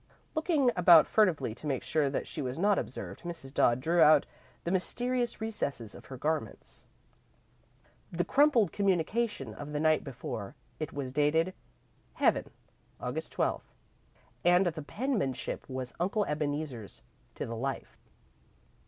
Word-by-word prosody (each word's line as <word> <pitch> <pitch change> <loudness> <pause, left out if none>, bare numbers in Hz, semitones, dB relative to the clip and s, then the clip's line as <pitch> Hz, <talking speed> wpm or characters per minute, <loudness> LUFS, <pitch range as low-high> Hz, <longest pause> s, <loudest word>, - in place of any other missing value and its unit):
Looking 310 -5 +2
about 170 -3 +8
furtively 185 - +2
to 150 - -7
make 135 -3 -1
sure 150 -3 +1
that 135 - -2
she 155 - -4
was 130 0 -3
not 200 +3 +3
observed, - - -6
Mrs. 170 -6 -7
Dodd 120 +1 +3
drew 165 +5 +2
out 150 -1 +7
of - - -32 0.3
the 170 - -2
mysterious 240 +6 -1
recesses 145 - -3
of - - -13
her 130 - -8
garments, 150 -4 -3 1.2
the 175 0 -1
crumpled 265 -3 +4
communication 195 - 0
of 145 +6 -8
the 150 - -1
night 155 0 +3
before. 115 -6 -6 0.2
It 155 - -3
was 135 -3 -5
dated, 160 +5 +2 0.6
"Heaven, - - +2 0.5
August - - -4
12th," - - -1 0.7
and 180 +2 +5
the 165 -3 -2
penmanship 205 - -2
was 130 -1 -4
Uncle 200 +4 +1
Ebeneezer's 145 -6 -4 0.3
to - - -4
the 115 - -5
life. 135 +4 -4
155 Hz, 140 wpm, -30 LUFS, 135-195 Hz, 1.2 s, about